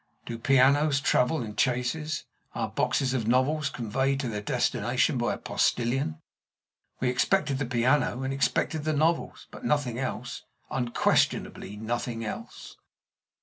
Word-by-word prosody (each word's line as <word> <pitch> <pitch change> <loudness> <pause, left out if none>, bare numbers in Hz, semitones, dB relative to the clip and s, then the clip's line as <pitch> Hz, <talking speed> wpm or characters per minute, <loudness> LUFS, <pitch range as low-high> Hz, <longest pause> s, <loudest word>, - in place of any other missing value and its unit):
Do 115 -1 -5
pianos 135 +3 +4
travel 125 0 +2
in 105 -2 -7
chaises? 135 +5 0 0.3
Are - - -1
boxes 130 -1 0
of 115 -4 -1
novels 135 +5 +2
conveyed 130 +4 -1
to 125 - -2
their 105 -2 -3
destination - - +1
by - - 0
a - - -9
postilion? 120 - 0 0.8
We 125 - +1
expected 140 +2 +1
the 140 - -1
piano 125 +2 +1
and 135 +1 -2
expected 145 +2 0
the 155 0 0
novels, 160 +3 0
but - - -11
nothing 135 -5 0
else 125 -2 -4 0.3
unquestionably 120 -4 0
nothing 115 +1 -3
else. 110 - -7
130 Hz, 135 wpm, -27 LUFS, 120-145 Hz, 0.8 s, pianos